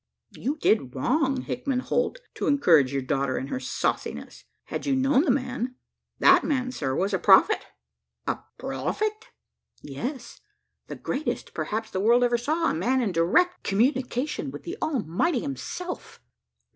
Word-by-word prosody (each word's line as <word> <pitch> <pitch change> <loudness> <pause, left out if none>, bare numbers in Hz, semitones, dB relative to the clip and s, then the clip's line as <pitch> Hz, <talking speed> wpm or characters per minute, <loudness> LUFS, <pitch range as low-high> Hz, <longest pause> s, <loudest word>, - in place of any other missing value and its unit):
"You 285 +4 -3
did 140 - +1
wrong, 270 - +1
Hickman 255 0 -2
Holt, - - -1
to - - -3
encourage 165 - +4
your 135 -1 -1
daughter 135 -1 0
in 135 - -4
her 255 - -2
sauciness. - - -3 0.2
Had - - -5
you 275 - +2
known 270 +3 +3
the - - 0
man 255 -1 -1 0.4
that - - +6
man, 255 -4 0
sir, 135 - -2
was 195 +5 0
a 190 - +1
prophet!" 205 - +5 0.6
"A - - -1 0.2
prophet!" 430 +1 -3 0.6
"Yes 240 - -6 0.5
the - - -6
greatest 310 - -3
perhaps 220 - -3
the 185 - -2
world 235 +5 +4
ever 240 -1 +2
saw 310 +7 +1
a - - -2
man 245 +11 +1
in 230 -6 0
direct 190 - +2
communication 255 +6 0
with - - -9
the 350 +2 -5
Almighty 255 - 0
himself." 350 - -6
255 Hz, 150 wpm, -26 LUFS, 190-290 Hz, 0.6 s, that